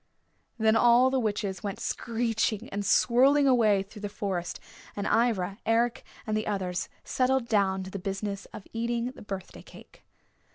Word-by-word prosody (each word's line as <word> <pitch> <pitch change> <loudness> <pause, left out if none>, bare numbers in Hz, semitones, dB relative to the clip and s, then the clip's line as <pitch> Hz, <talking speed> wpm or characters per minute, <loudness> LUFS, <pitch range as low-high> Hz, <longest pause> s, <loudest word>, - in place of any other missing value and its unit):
Then 220 -1 +3
all 240 +3 +5
the 265 - +2
witches 205 -4 -2
went 200 -2 -4
screeching 225 -2 -1
and 200 +1 -3
swirling 270 +7 +4
away 215 -6 +4
through 205 +2 -13
the 205 - -4
forest, 190 -4 -3 0.4
and 205 - -3
Ivra, 205 -4 +1
Eric 230 +1 +1 0.2
and 215 - -1
the 215 0 -1
others 185 -3 -2
settled 255 -1 +1
down 195 -3 +1
to 190 - -8
the 195 - -5
business 195 +1 -4
of 200 - -11
eating 235 +1 -1
the - - -14
birthday 195 -3 -7
cake. - - -16
215 Hz, 160 wpm, -28 LUFS, 195-235 Hz, 0.4 s, all